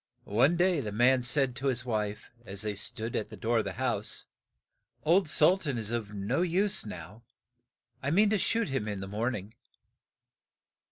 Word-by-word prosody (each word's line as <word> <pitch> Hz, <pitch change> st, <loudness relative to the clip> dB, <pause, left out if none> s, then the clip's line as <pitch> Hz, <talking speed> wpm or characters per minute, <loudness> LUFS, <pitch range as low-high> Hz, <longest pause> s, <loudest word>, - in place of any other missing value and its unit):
One 125 Hz, +11 st, +3 dB
day 180 Hz, -2 st, +3 dB
the 110 Hz, -6 st, -4 dB
man 125 Hz, +4 st, +4 dB
said 125 Hz, 0 st, +1 dB
to 135 Hz, +1 st, -2 dB
his 130 Hz, -1 st, 0 dB
wife, 105 Hz, -3 st, -3 dB
as 100 Hz, -2 st, -6 dB
they 105 Hz, -1 st, -2 dB
stood 110 Hz, +3 st, -2 dB
at 105 Hz, -, -2 dB
the -, -, -10 dB
door 115 Hz, +1 st, +1 dB
of -, -, -1 dB
the -, -, -3 dB
house, 120 Hz, -5 st, -1 dB, 0.8 s
"Old 170 Hz, +1 st, +3 dB
Sul 175 Hz, +6 st, +4 dB
tan 140 Hz, -8 st, -2 dB
is 110 Hz, -1 st, -4 dB
of 110 Hz, -3 st, -3 dB
no 105 Hz, -, -1 dB
use 185 Hz, +3 st, +1 dB
now; 90 Hz, +4 st, -9 dB, 0.8 s
I 140 Hz, -, -1 dB
mean 205 Hz, +6 st, +4 dB
to 215 Hz, -, +2 dB
shoot 230 Hz, +2 st, 0 dB
him 135 Hz, -6 st, -2 dB
in 100 Hz, -2 st, -3 dB
the 95 Hz, -, -5 dB
morn 115 Hz, +5 st, -1 dB
ing. 100 Hz, +2 st, -8 dB
120 Hz, 185 wpm, -29 LUFS, 105-150 Hz, 0.8 s, man